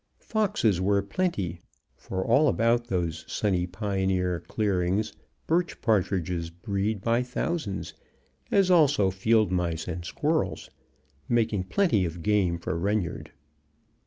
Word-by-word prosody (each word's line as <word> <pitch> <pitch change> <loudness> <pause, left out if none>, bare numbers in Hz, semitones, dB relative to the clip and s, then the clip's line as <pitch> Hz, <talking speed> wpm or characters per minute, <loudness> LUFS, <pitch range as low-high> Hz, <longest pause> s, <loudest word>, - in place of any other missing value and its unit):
Foxes 150 - 0
were 100 +1 +3
plenty, 100 - -2 0.4
for 95 0 -4 0.3
about 115 0 +3
all 120 - -26
those 85 -5 -2
sunny 90 -4 0
pioneer 95 -2 -1
clearings 100 0 0 0.3
birch 175 +2 0
partridges 90 -6 0
breed 100 +4 -2
by 115 +1 +2
thousands, 125 - -3 0.6
as 195 -2 +3
also 145 - +4
field 110 +1 +2
mice 85 -3 -1
and 90 0 -4
squirrels, 155 - -1 0.6
making 110 -5 +1
plenty 110 - +2
of 85 -1 -4
game 100 -5 +2
for 85 - -3
Reynard. 100 -1 -2
100 Hz, 115 wpm, -27 LUFS, 90-115 Hz, 0.6 s, also